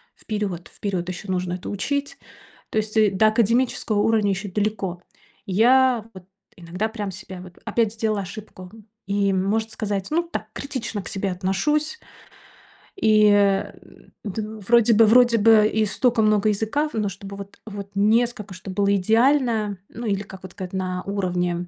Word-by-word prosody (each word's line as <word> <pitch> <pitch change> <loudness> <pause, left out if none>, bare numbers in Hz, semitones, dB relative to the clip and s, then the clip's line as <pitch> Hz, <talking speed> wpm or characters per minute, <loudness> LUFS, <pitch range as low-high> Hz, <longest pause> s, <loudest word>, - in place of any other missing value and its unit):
вперёд 200 -5 -4
вперёд 185 -3 -4
ещё 185 +3 -7
нужно 180 -1 -2
это 180 - -7
учить. 280 +8 -2 0.5
То - - -3
есть, 215 0 -1
э, 215 -2 +5
до 195 +3 +3
академического 230 0 +1
уровня 215 -1 +2
ещё 195 +2 -3
далеко. 200 -3 -2 0.4
Я 240 +3 +4
вот 190 -2 -12 0.3
иногда 180 +5 -3
прям 210 -3 -5
себя 190 -1 -9
вот 180 -1 -13
опять 225 -1 0
сделала 220 -2 -1
ошибку. 185 -1 -10 0.3
И 200 0 +1
может 210 +4 0
сказать, 205 -3 -3
ну 335 +2 +2
так 340 - -5
критично 260 -6 -4
к - - -8
себе 195 0 -2
отношусь. 295 - -1 1.0
И, 215 - +4
э, 200 -1 +3
м, - - -20
д 210 +1 -4 0.3
вроде 235 -1 +5
бы 225 +1 +6
вроде 240 +1 +5
бы 215 0 +6
и 220 0 +1
стока 235 +3 +1
много 215 0 +3
языка 220 +9 0
в - - -20
но 210 -2 0
чтобы 195 +1 -9
вот 200 0 -10
вот 200 -2 -7
несколько, 215 0 +1
чтоб 185 +2 -8
было 200 0 +2
идеально. 225 0 +2
Ну 235 +1 -8
или 200 -2 0
как 190 -1 -12
вот 185 - -9
сказать 185 0 -8
на 185 -1 -2
уровне. 180 -3 -2
205 Hz, 165 wpm, -23 LUFS, 190-225 Hz, 1.0 s, бы